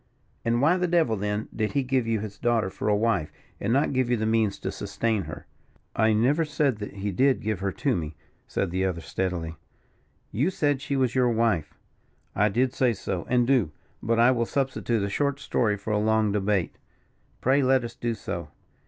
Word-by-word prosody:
"And 120 Hz, +2 st, +1 dB
why 165 Hz, +5 st, +4 dB
the 180 Hz, -1 st, 0 dB
devil, 165 Hz, -10 st, +2 dB
then, 105 Hz, +1 st, -2 dB
did 110 Hz, -1 st, -1 dB
he 140 Hz, -1 st, +1 dB
give 130 Hz, -2 st, 0 dB
you 110 Hz, -2 st, 0 dB
his 105 Hz, -2 st, -7 dB
daughter 115 Hz, -5 st, +1 dB
for -, -, -4 dB
a 105 Hz, -, +4 dB
wife, 105 Hz, -7 st, +1 dB, 0.3 s
and 105 Hz, -, -1 dB
not 140 Hz, +3 st, +2 dB
give 130 Hz, -2 st, +1 dB
you 120 Hz, -, +2 dB
the 110 Hz, -, -1 dB
means 110 Hz, -2 st, +1 dB
to -, -, -4 dB
sustain 110 Hz, -5 st, -2 dB
her." 75 Hz, 0 st, -8 dB, 0.5 s
"I 110 Hz, 0 st, +3 dB
never 130 Hz, +9 st, +3 dB
said 145 Hz, -5 st, 0 dB
that 105 Hz, -, -6 dB
he 100 Hz, +1 st, -3 dB
did 130 Hz, +8 st, +3 dB
give 110 Hz, -3 st, -1 dB
her 100 Hz, 0 st, -1 dB
to 135 Hz, -4 st, 0 dB
me," 80 Hz, -2 st, -4 dB, 0.3 s
said 95 Hz, -, -2 dB
the 95 Hz, +1 st, 0 dB
other, 90 Hz, -3 st, -1 dB
steadily. 85 Hz, -3 st, -3 dB, 0.7 s
"You 135 Hz, -, +1 dB
said 145 Hz, -7 st, 0 dB
she 140 Hz, -, -2 dB
was 130 Hz, -3 st, +1 dB
your 125 Hz, -2 st, +3 dB
wife." 115 Hz, -8 st, 0 dB, 0.6 s
"I 105 Hz, +1 st, +3 dB
did 125 Hz, +5 st, +1 dB
say 125 Hz, -3 st, +2 dB
so, 95 Hz, -3 st, -4 dB
and 125 Hz, -1 st, +3 dB
do. 120 Hz, -, +2 dB, 0.3 s
But 115 Hz, 0 st, +1 dB
I 120 Hz, +2 st, +6 dB
will 120 Hz, -2 st, 0 dB
substitute 130 Hz, -5 st, -1 dB
a -, -, 0 dB
short 140 Hz, +6 st, -1 dB
story 105 Hz, -6 st, 0 dB
for 105 Hz, +2 st, -3 dB
a 105 Hz, -, +2 dB
long 110 Hz, 0 st, +2 dB
debate." 100 Hz, -4 st, 0 dB, 0.6 s
"Pray 135 Hz, +3 st, +3 dB
let 130 Hz, -1 st, +3 dB
us 120 Hz, 0 st, -6 dB
do 120 Hz, -1 st, -2 dB
so." -, -, -5 dB
115 Hz, 205 wpm, -26 LUFS, 100-130 Hz, 0.7 s, I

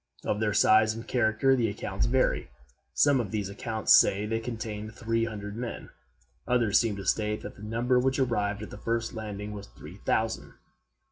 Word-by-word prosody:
Of 105 Hz, -, 0 dB
their 110 Hz, -1 st, +1 dB
size 110 Hz, +1 st, +4 dB
and 115 Hz, -, -8 dB
character 120 Hz, +2 st, +2 dB
the 120 Hz, -3 st, +1 dB
accounts -, -, -2 dB
vary. -, -, +1 dB, 0.5 s
Some 140 Hz, -, +4 dB
of 115 Hz, -5 st, -2 dB
these 105 Hz, -1 st, -2 dB
accounts 110 Hz, +2 st, +1 dB
say 100 Hz, +2 st, +5 dB
they 115 Hz, +1 st, -1 dB
contained 110 Hz, -2 st, -6 dB
three 115 Hz, 0 st, 0 dB
hundred 105 Hz, -2 st, -6 dB
men; 120 Hz, 0 st, -6 dB, 0.6 s
others 120 Hz, -4 st, +3 dB
seem 115 Hz, -3 st, 0 dB
to 100 Hz, -1 st, -7 dB
state 105 Hz, +2 st, 0 dB
that -, -, -8 dB
the -, -, -15 dB
number 120 Hz, +4 st, +1 dB
which 130 Hz, +1 st, +1 dB
arrived 105 Hz, -5 st, 0 dB
at -, -, -9 dB
the -, -, -9 dB
first 115 Hz, -1 st, -2 dB
landing 105 Hz, -1 st, -6 dB
was 105 Hz, -1 st, -8 dB
three 75 Hz, +9 st, -12 dB
thousand. 110 Hz, +2 st, -1 dB
110 Hz, 185 wpm, -28 LUFS, 105-115 Hz, 0.6 s, say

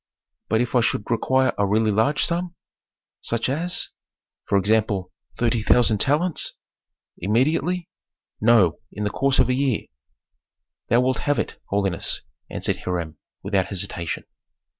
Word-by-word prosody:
"But 110 Hz, +2 st, +2 dB
if 125 Hz, -, -2 dB
I 125 Hz, -, +4 dB
should 110 Hz, -1 st, -1 dB
require 130 Hz, +3 st, +2 dB
a 100 Hz, -, +3 dB
really 110 Hz, +2 st, +2 dB
large 140 Hz, +9 st, +2 dB
sum?" 175 Hz, +1 st, -2 dB, 0.7 s
"Such 115 Hz, +1 st, -1 dB
as 170 Hz, +6 st, -1 dB, 0.3 s
?" -, -, -70 dB
"For 100 Hz, -, +3 dB
example, 100 Hz, -1 st, +1 dB, 0.3 s
thirty 120 Hz, -1 st, +1 dB
thousand 110 Hz, -1 st, +4 dB
talents." 155 Hz, +5 st, +1 dB, 0.7 s
"Immediately?" 155 Hz, -, +1 dB, 0.5 s
"No, 105 Hz, -7 st, +4 dB
in 105 Hz, -, -5 dB
the 105 Hz, -, -1 dB
course 135 Hz, -1 st, +1 dB
of 125 Hz, -, +4 dB
a 125 Hz, -, +1 dB
year." 130 Hz, -3 st, +1 dB, 1.1 s
"Thou 120 Hz, +2 st, +4 dB
wilt 130 Hz, +1 st, +1 dB
have 145 Hz, -1 st, 0 dB
it, -, -, -3 dB
holiness," 100 Hz, -4 st, 0 dB, 0.3 s
answered -, -, -1 dB
Hiram, 85 Hz, -4 st, -4 dB, 0.2 s
without 95 Hz, -1 st, 0 dB
hesitation. 90 Hz, -4 st, -3 dB
115 Hz, 140 wpm, -23 LUFS, 100-135 Hz, 1.1 s, I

